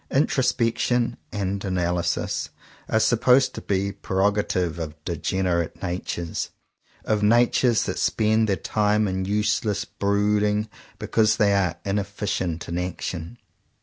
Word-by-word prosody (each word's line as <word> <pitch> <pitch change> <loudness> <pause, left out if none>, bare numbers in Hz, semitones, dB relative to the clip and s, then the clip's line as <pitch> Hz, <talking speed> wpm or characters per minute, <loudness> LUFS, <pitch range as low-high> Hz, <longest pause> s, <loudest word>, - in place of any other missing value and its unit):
Introspection 120 -3 +1 0.2
and 100 -1 -2
analysis 90 -3 -1 0.4
are 110 - +3
supposed 125 +4 +4
to - - -6
be 100 0 0
a - - -7
preroga 100 +2 +1
tive 85 -2 -1
of 80 -2 -5
degenerate 85 0 -1
natures, 85 -2 -3 0.6
of 105 -1 +1
natures 120 +2 +3
that - - -3
spend 110 0 +2
their 100 - +3
time 105 +1 +1
in 95 0 -2
useless 105 +1 0
brooding 105 +1 +1 0.3
because 110 -1 +2
they 105 -3 +3
are 90 -4 +1
inefficient 100 -4 -2
in 85 +1 -2
action. 90 +2 -5
100 Hz, 120 wpm, -24 LUFS, 90-110 Hz, 0.6 s, supposed